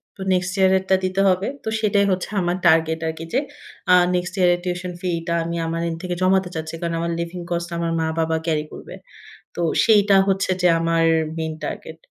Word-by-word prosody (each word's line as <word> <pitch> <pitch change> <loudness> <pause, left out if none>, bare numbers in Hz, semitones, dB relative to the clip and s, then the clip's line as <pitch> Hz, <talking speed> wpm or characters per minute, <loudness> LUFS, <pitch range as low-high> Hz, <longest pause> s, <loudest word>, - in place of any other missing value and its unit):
তো - - -12
next 180 0 0
year 190 -1 +4
এরটা 190 0 +1
দিতে 185 +1 0
হবে। 185 +1 +1 0.2
তো - - -2
সেটাই 205 -2 +2
হচ্ছে 185 0 -2
আমার 175 0 0
টার্গেট 160 -1 +3
আরকি 160 +1 -5
যে, 260 - +3 0.5
আ - - +9 0.2
next 180 +1 -2
year 180 -1 +4
এর - - -8
টিউশন 180 0 -3
ফিটা 170 -2 -2
আমি 170 +1 -4
আমার 165 +1 -2
end 165 - -4
থেকে 180 -1 -3
জমাতে 185 0 +2
চাচ্ছি। 160 0 -5
কারণ 170 -1 -2
আমার 170 0 -2
living 170 +1 -5
cost 170 0 -2
আমার 170 0 -1
মা-বাবা 160 0 0
carry 155 -2 0
করবে। - - -10 0.6
তো - - -3 0.2
সেইটা 205 -3 +5
হচ্ছে 195 -1 +1
যে, 180 - +4
আমার 165 0 +1 0.3
মেইন 160 -1 -3
টার্গেট। 160 +2 -6
175 Hz, 200 wpm, -21 LUFS, 165-185 Hz, 0.6 s, আ